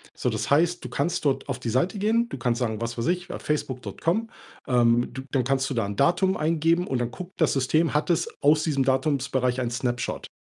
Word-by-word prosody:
So, - - -1
das 110 0 -3
heißt, 170 +4 +3
du - - -5
kannst 160 +3 -1
dort 140 -2 +1
auf - - -2
die 115 - -3
Seite 150 - 0
gehen. 225 +3 +2
Du - - -5
kannst 120 -1 0
sagen, 110 -3 -2
was 115 0 -3
weiß 115 - -1
ich, 180 0 0
ja, - - -5
Facebook.com 150 - -2 0.4
ähm, 120 -1 +3
du 130 - -6
dann 130 -3 +1
kannst 135 +1 +1
du - - -2
da 115 -4 0
'n 100 - -5
Datum 190 - +2
eingeben 165 +2 +2
und 130 - -1
dann 120 -1 -1
guckt 180 +6 -9
das 160 - +4
System, 155 +5 +1
hat 150 - +1
es 170 - +1
aus 150 +2 +5
diesem 140 -4 +1
Datumsbereich 130 -2 +1
einen 120 -1 -2
Snapshot. 120 0 -2
135 Hz, 225 wpm, -25 LUFS, 125-165 Hz, 0.4 s, aus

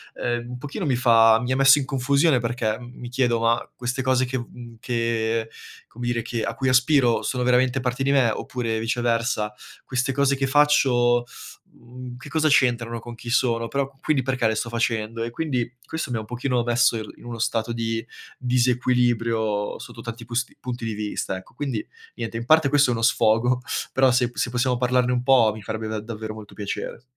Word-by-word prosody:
ehm, 120 0 -3
un 125 - -6
pochino 145 - -5
mi 130 -3 +1
fa 115 -2 +5
mi 125 +1 -3
ha 130 - +1
messo 135 +1 +7
in 145 - 0
confusione 140 +1 +2
perché 115 -1 -2
m 120 0 -11
mi 120 - -9
chiedo: 120 -2 +1
ma 115 0 +1
queste 125 +2 -3
cose 130 0 +2
che 130 +1 -2
v 120 - -5
mhmm, 120 -1 -11
che 115 -1 -1 0.4
come 120 +1 -7
dire, 120 -1 0
che 115 0 -3
a - - -2
cui 130 -1 0
aspiro 130 -1 +3
sono 125 -1 -1
veramente 125 +1 +2
parte 125 +1 -2
di 140 - +2
me? 130 -4 +4
Oppure 115 -1 -3
viceversa, 115 -2 0 0.3
queste 125 +1 -1
cose 140 0 +2
che 135 - 0
faccio, 125 -4 +3 0.5
mhmm, 125 +1 -10
che 135 - -11
cosa 155 0 +1
c'entrano 120 -5 +2
con 120 0 -9
chi 120 +1 -9
sono? 115 -2 +1
Però 140 +1 -1
q 135 -1 -29
quindi 145 -5 +1
perché 130 -3 0
le 110 - 0
sto 115 - -2
facendo? 115 -1 -1
E 120 - -3
quindi, 125 -3 -2 0.2
questo 160 -3 -4
mi 120 - -1
ha - - -2
un - - -9
pochino 120 +1 -1
messo 120 -1 +3
il 110 -1 -6
in - - -16
uno 120 -1 -6
stato 115 +1 -1
di 115 0 -2 0.3
disequilibrio 120 -4 +1
sotto - - -11
tanti 115 0 -7
pusti 120 +2 -3
punti 120 -2 -5
di 110 - -2
vista, 105 -2 -3
ecco. 95 - -12
Quindi, 145 - -3 0.3
niente, 115 0 -4
in 115 - -5
parte 155 0 +5
questo 140 -3 +4
è - - +1
uno 115 - -3
sfogo, 115 +2 +3 0.3
però 130 -1 +4
se 125 -1 +2
p - - -22
se 125 - -1
possiamo 125 0 +1
parlarne 125 0 +2
un 125 0 0
po' 125 -4 +5
mi 110 - -9
farebbe 110 +2 -4
da 110 0 -3
davvero 110 0 -6
molto 105 -2 -11
piacere. 105 +3 -5
120 Hz, 210 wpm, -23 LUFS, 115-130 Hz, 0.5 s, messo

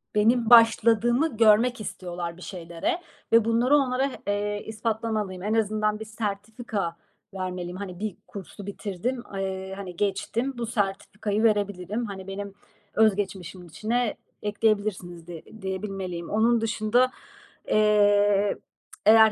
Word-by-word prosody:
benim 225 +2 +3
başladığımı 235 +3 +5
görmek 225 +2 +4
istiyorlar 175 -4 -5
bir - - -14
şeylere 175 - -3 0.3
ve 230 -1 +6
bunları 235 +5 +3
onlara 265 0 +1
h - - -8
eee, 205 0 -1
ispatlamalıyım. 215 -3 -2
En 210 +2 0
azından 215 -1 +1
bir 220 - -6
sertifika 210 -3 -4 0.4
vermeliyim. 180 -1 -4
Hani, 185 -3 -7
bir 215 -2 -4
kursu 200 +1 -9
bitirdim. 205 +5 -4
Eee, 190 0 -3
hani, 190 -3 -7
geçtim 215 +7 -1
bu 235 - -2
sertifikayı 210 0 -2
verebilirim. 205 0 0
Hani, 195 -3 -7
benim 200 +1 -5 0.4
öz 220 -2 +4
geçmişimin 185 -3 -5
içine 220 +8 -1 0.3
ekleyebilirsiniz 205 -5 -1
diye 170 -2 -8 0.2
diyebilmeliyim. 190 -3 -4
Onun 230 +2 +3
dışında, 225 +3 +2 0.6
eee, 205 -1 +4 0.5
eğer, 220 +1 +8
210 Hz, 120 wpm, -26 LUFS, 190-225 Hz, 0.6 s, eğer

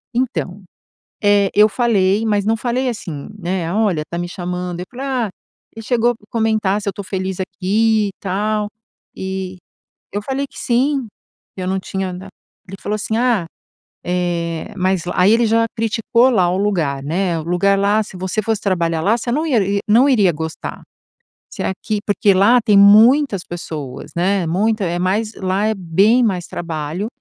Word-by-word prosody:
Então, 230 -6 -2 0.6
eh, 205 -1 +4
eu 210 +1 +6
falei, 215 -3 +1
mas 205 -2 +1
não 220 +2 +2
falei 250 +3 -1
assim, 165 - -6
né: 175 -2 -2
"Olha, 200 -7 +1
tá 170 - -3
me 175 0 -3
chamando". 180 0 -4
Eu 180 - -6
falei: 260 +2 -6
"Ah, 250 -6 -1 0.5
ele 225 - -8
chegou 240 -1 +2
a - - -2
comentar 215 -3 +1
se 200 - -3
eu - - +2
estou 200 +1 -8
feliz 190 -1 -3
aqui 210 +3 +1
e - - -5
tal. 210 +2 -1 0.5
E 190 -1 -5 0.5
eu 205 - -3
falei 270 +5 -2
que - - -16
sim, 260 +1 0 0.5
que 190 - -6
eu - - -3
não 190 +1 0
tinha 190 0 -4
na" 185 +2 -8 0.4
Ele 195 +1 -8
falou 210 - -2
assim: 220 +1 -2
"Ah, 235 -8 +1 0.6
eh, 170 -2 -2
mas 185 -2 +1
lá" 180 - -4
aí 190 +4 +5
ele 235 +1 +3
já 225 +1 +3
criticou 225 +2 +2
lá 190 -8 +3
o 180 - 0
lugar, 165 -9 0
né: 170 +3 -1
"O - - -5
lugar 180 +4 +2
lá, 200 +2 +2
se 205 - -8
você 185 +3 -2
fosse 220 0 -1
trabalhar 170 -4 0
lá, 210 +7 +2
você 240 +1 -3
não 305 +4 0
ia 265 -8 +2 0.3
não 235 +6 +5
iria 210 -10 +4
gostar. 160 0 -6 0.7
Se - - -5
aqui 210 +3 -2
Porque 205 -1 +3
lá 215 +6 +5
tem 215 -3 +3
muitas 215 +2 +6
pessoas, 155 -6 -7
né, 185 +2 +1
muita 205 +5 +1
é 175 0 -1
mais 205 +5 -1
lá 190 +2 0
é 220 - +1
bem 195 +6 +3
mais 185 -6 -1
trabalho 165 +3 -4
200 Hz, 180 wpm, -18 LUFS, 180-225 Hz, 0.7 s, eu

